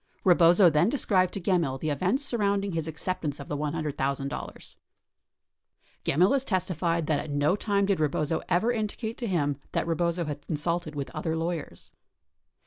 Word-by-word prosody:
Rebozo 175 0 +6
then 155 +7 +3
described 190 -9 +2
to - - -2
Gemmill 170 -8 +1
the 155 +1 -1
events 185 - 0
surrounding 200 -5 0
his 165 -2 -3
acceptance 160 -2 -3
of 140 - -9
the 145 - -2
$100,000. 145 -2 -3 1.3
Gemmill 180 - +3
has 275 -2 +1
testified 175 - -1
that 150 -2 +1
at 155 - -6
no 145 +4 +2
time 200 -1 +1
did 195 -3 +1
Rebozo 155 +1 0
ever 185 +7 +2
indicate 220 0 -3
to 240 - -2
him 145 -7 0 0.2
that - - 0
Rebozo 170 +1 0
had 145 -1 -6
consulted 165 0 -2
with 140 -2 -4
other 160 0 -2
lawyers. 165 -1 -4
170 Hz, 155 wpm, -27 LUFS, 150-190 Hz, 1.3 s, Rebozo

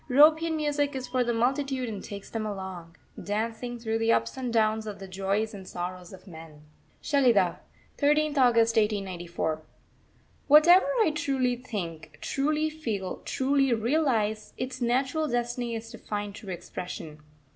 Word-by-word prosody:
European 315 +4 +5
Music 290 -1 0
is 255 -1 -4
for 250 0 +1
the 240 - 0
multitude 260 +2 0
and 210 -3 -5
takes 200 -1 -8
them 225 -1 -4
along, 190 -5 -6 0.3
dancing, 230 +4 -3
through 225 -1 -2
the 225 0 +2
ups - - +1
and 255 -2 -3
downs 220 -1 +1
of 210 - -5
the 195 - -9
joys 195 +4 -1
and 190 -2 -9
sorrows 180 0 -6
of 190 0 -13
men. 160 -4 -12 0.4
SHELIDAH, 240 - +3 0.4
13th 300 +1 +3
August 230 -3 +4
1894. 180 -7 -1 0.9
Whatever 320 +6 +7 0.2
I 320 - +2
truly 265 -4 0
think, 165 -11 -6
truly 300 +3 0
feel, 220 -12 -4
truly 275 -1 +1
realise, 225 -4 0
its 255 0 -5
natural 265 +6 +1
destiny 240 -1 -2
is 225 0 -7
to 230 - -10
find 205 -1 -4
true 205 -2 -8
expression. 175 -3 -7
230 Hz, 145 wpm, -28 LUFS, 195-270 Hz, 0.9 s, Whatever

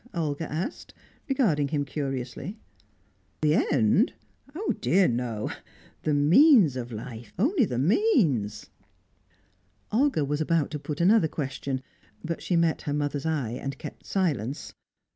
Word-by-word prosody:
Olga 155 -1 -2
asked, 175 - -5 0.3
regarding 190 - +2
him 145 0 -1
curiously. 135 - -4 0.8
"The 150 -1 +3 0.2
end? 140 - +3 0.4
Oh, 410 +6 -1
dear 190 -1 +4
no! 115 -3 -2 0.5
The 150 - +1
means 175 - +6
of 120 -1 -5
life, 115 +1 -8
only 275 - +3
the 125 - -3
means!" 155 - +1 1.2
Olga 245 - +2
was 145 +2 -1
about 165 -1 +1
to 150 - -4
put 150 +2 -4
another 190 -1 +5
question, 135 -3 -4 0.4
but 165 0 -4
she 180 - -1
met 165 -1 +2
her - - 0
mother's 145 0 -2
eye, 145 -8 -1
and 135 +3 -5
kept 150 - -9
silence. 145 - -1
150 Hz, 130 wpm, -27 LUFS, 135-185 Hz, 1.2 s, means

